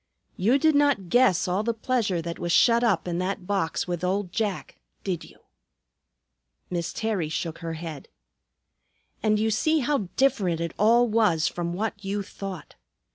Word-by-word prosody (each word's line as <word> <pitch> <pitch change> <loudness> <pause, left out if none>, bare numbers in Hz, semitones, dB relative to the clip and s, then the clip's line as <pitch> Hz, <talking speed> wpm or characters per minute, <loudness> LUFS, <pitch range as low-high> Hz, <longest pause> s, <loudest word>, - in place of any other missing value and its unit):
"You 225 +9 +3
did 315 +2 +3
not 285 -11 +2
guess 245 -8 +4
all 180 +3 +1
the 230 +1 -1
pleasure 220 -8 0
that 170 0 -5
was 175 - -2
shut 235 +6 +5
up 190 -8 +1
in 175 0 -2
that 185 0 -3
box 190 -5 -1
with 175 -1 -3
old 185 0 -1
Jack, 210 -3 -3 0.2
did 180 -4 -2
you?" - - -16 1.3
Miss 170 -2 -2
Terry 210 -8 -2
shook 160 +1 -4
her 165 -1 -4
head. 160 -3 -7 1.1
"And 215 -1 +2
you 220 +1 +1
see 310 +8 +2
how 250 -8 0
different 195 -11 +2
it 170 -1 -3
all 235 +3 +5
was 210 -8 +2
from 170 -1 -3
what 205 +1 -3
you 200 +1 -2
thought. 195 -3 -8
195 Hz, 165 wpm, -26 LUFS, 175-225 Hz, 1.3 s, shut